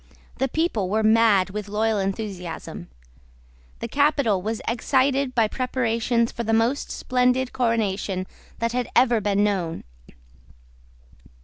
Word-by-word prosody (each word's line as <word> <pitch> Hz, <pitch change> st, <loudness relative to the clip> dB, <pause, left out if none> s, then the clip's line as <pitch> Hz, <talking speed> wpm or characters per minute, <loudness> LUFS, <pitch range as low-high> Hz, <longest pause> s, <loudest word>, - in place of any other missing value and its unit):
The 270 Hz, -, +2 dB
people 250 Hz, -, -1 dB
were 220 Hz, +2 st, +1 dB
mad 215 Hz, -4 st, +4 dB
with 210 Hz, 0 st, -5 dB
loyal 215 Hz, +1 st, 0 dB
enthusiasm. 195 Hz, -4 st, -5 dB, 0.9 s
The -, -, -3 dB
capital 280 Hz, -9 st, +2 dB
was 220 Hz, +3 st, -3 dB
excited 265 Hz, +3 st, +1 dB
by 225 Hz, -3 st, +3 dB
preparations 235 Hz, -1 st, 0 dB
for -, -, -5 dB
the 225 Hz, 0 st, -1 dB
most 230 Hz, +5 st, +1 dB
splendid 250 Hz, 0 st, 0 dB
coronation 210 Hz, -6 st, -1 dB, 0.3 s
that 230 Hz, 0 st, -1 dB
had 245 Hz, 0 st, -2 dB
ever 240 Hz, -3 st, +4 dB
been 205 Hz, 0 st, +1 dB
known. 185 Hz, -6 st, -1 dB
225 Hz, 120 wpm, -24 LUFS, 205-250 Hz, 0.9 s, mad